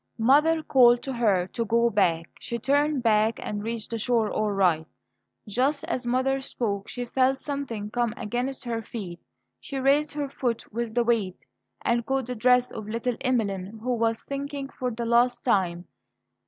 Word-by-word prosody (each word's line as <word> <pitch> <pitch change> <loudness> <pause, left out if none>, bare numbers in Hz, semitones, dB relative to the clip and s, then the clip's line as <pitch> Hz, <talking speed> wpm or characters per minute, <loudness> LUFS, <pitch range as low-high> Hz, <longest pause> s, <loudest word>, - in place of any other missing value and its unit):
Mother 300 +7 +4
called 245 -4 +5
to 270 - -4
her 205 -7 +2
to 235 - -1
go 235 +2 +2
back. 165 -5 +1
She 235 - -4
turned 285 +2 +1
back, 220 0 +3
and 205 -1 -4
reached 230 0 -5
the 230 - -2
shore 225 -1 +1
all 215 0 0
right. 175 -5 +2 0.6
Just 270 +7 0
as 255 -5 -3
mother 265 +2 +1
spoke, 205 -7 -3
she 245 -1 -5
felt 260 +2 +2
something 265 -8 -4
come 240 -1 0
against 245 +4 -3
her 230 -1 -2
feet. 195 -6 -7 0.4
She 275 - -6
raised 280 +3 +2
her 290 -1 -2
foot 245 -5 -3
with 235 0 -3
the 240 - +3
weight, 220 -6 -1 0.4
and 235 0 +2
caught 265 +2 -1
the 250 +1 -4
dress 250 +2 +3
of 215 -1 -7
little 235 +2 -1
Emeline, 215 -6 -1
who 250 0 0
was 230 -1 0
sinking 280 0 -4
for 250 -2 -3
the 235 0 -4
last 240 +1 +3
time. 180 -6 +1
235 Hz, 175 wpm, -26 LUFS, 215-265 Hz, 0.6 s, called